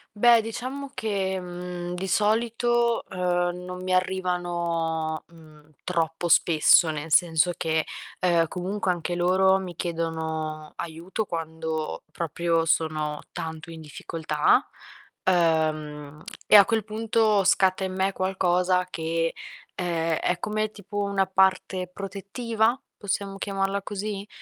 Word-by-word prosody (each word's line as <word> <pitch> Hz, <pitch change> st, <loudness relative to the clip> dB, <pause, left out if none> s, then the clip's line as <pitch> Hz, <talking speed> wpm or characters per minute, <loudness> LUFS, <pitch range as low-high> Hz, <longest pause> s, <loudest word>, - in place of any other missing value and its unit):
Beh, 235 Hz, +2 st, +6 dB
diciamo 255 Hz, +5 st, -5 dB
che, 190 Hz, -3 st, -1 dB
mhmm, 180 Hz, 0 st, -6 dB
di 180 Hz, +2 st, -4 dB
solito, 235 Hz, +4 st, +2 dB
uhm, 180 Hz, -1 st, 0 dB
non 180 Hz, 0 st, -7 dB
mi 185 Hz, 0 st, -1 dB
arrivano, 175 Hz, -3 st, -1 dB
mhmm, 155 Hz, -2 st, -18 dB
troppo 165 Hz, -1 st, -1 dB
spesso, 165 Hz, 0 st, +5 dB
nel 155 Hz, +1 st, -4 dB
senso 170 Hz, +1 st, +4 dB
che, 160 Hz, -1 st, 0 dB, 0.3 s
uhm, 170 Hz, -2 st, +3 dB
comunque 185 Hz, +1 st, -1 dB
anche 175 Hz, 0 st, -2 dB
loro 190 Hz, +2 st, +4 dB
mi 185 Hz, -2 st, -6 dB
chiedono 160 Hz, -2 st, -3 dB
aiuto 170 Hz, +6 st, -4 dB
quando 160 Hz, -3 st, -4 dB
proprio 165 Hz, +1 st, 0 dB
sono 155 Hz, -2 st, 0 dB
tanto 160 Hz, +1 st, -6 dB
in 165 Hz, -, -9 dB
difficoltà, 155 Hz, 0 st, 0 dB, 0.6 s
uhm, 155 Hz, -4 st, +1 dB, 0.2 s
e -, -, +6 dB
a 200 Hz, -, +9 dB
quel 225 Hz, 0 st, 0 dB
punto 215 Hz, -1 st, +1 dB
scatta 190 Hz, 0 st, +3 dB
in 185 Hz, -, -4 dB
me 190 Hz, +1 st, +1 dB
qualcosa 180 Hz, -1 st, +1 dB
che, 165 Hz, 0 st, -1 dB, 0.5 s
uhm, -, -, -2 dB, 0.3 s
è 180 Hz, -, 0 dB
come 215 Hz, 0 st, -1 dB
tipo 205 Hz, -1 st, -9 dB
una 200 Hz, -1 st, +1 dB
parte 190 Hz, -1 st, +2 dB
protettiva, 220 Hz, +5 st, -1 dB, 0.2 s
possiamo 200 Hz, 0 st, -3 dB
chiamarla 195 Hz, 0 st, -1 dB
così? 205 Hz, 0 st, -5 dB
180 Hz, 120 wpm, -26 LUFS, 165-195 Hz, 0.6 s, a